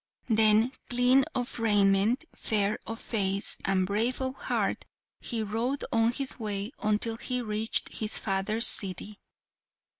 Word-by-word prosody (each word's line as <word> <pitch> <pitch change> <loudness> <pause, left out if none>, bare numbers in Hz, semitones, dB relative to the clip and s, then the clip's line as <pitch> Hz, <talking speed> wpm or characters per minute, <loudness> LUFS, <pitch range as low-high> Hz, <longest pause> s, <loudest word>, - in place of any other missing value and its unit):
Then, 220 +2 +4 0.2
clean 250 +2 +4
of 245 -1 -3
raiment, 205 +4 +3
fair 210 -2 0
of 225 +1 -5
face, 200 -3 -1
and 190 -1 +2
brave 220 +6 0
of 260 -1 -2
heart, - - -2 0.4
he 230 -3 -3
rode 230 +6 -2
on 225 0 +3
his 265 +1 -3
way 205 0 -3
until 215 +2 0
he 250 +1 -2
reached 220 -1 -1
his 215 -1 -2
father's 210 +3 +1
city. 200 +2 0
220 Hz, 130 wpm, -28 LUFS, 205-240 Hz, 0.4 s, Then